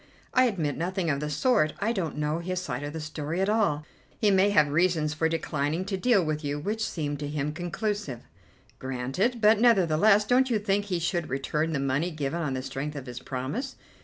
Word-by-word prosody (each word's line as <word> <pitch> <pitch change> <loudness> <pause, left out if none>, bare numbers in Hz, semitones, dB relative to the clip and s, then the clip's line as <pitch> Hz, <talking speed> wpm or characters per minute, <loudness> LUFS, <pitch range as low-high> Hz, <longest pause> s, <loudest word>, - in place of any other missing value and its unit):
"I 255 0 +5
admit 165 - -1
nothing 175 0 -1
of 140 - -1
the 150 +1 -3
sort: 155 - +2
I 225 - +1
don't 175 -10 -3
know 150 +2 -1
his 185 +1 -2
side 130 -8 -4
of 145 0 -4
the 160 - -5
story 155 +2 -4
at 195 +1 +1
all. 200 -9 +1 0.3
He 210 -2 +4
may 195 +1 +4
have 155 -7 +4
reasons 155 -1 +2
for 160 +1 +1
declining 160 +1 -1
to 195 0 -2
deal 195 -2 +3
with 155 0 -2
you, 145 0 -2
which 210 +9 -2
seem 145 -3 -3
to 145 0 -4
him 150 0 -2
conclusive." 175 - -3 0.6
"Granted. 135 - -1
But 215 0 +5
nevertheless, 205 -2 +4
don't 255 +3 +3
you 230 - +2
think 205 -1 0
he 185 -3 -1
should 170 0 -1
return 150 +4 -1
the 140 - 0
money 135 +5 0
given 155 0 -3
on 140 -5 -1
the 130 - -3
strength 145 +3 -4
of 140 -3 -6
his 125 -1 -7
promise?" 135 - -4
160 Hz, 210 wpm, -27 LUFS, 145-200 Hz, 0.6 s, I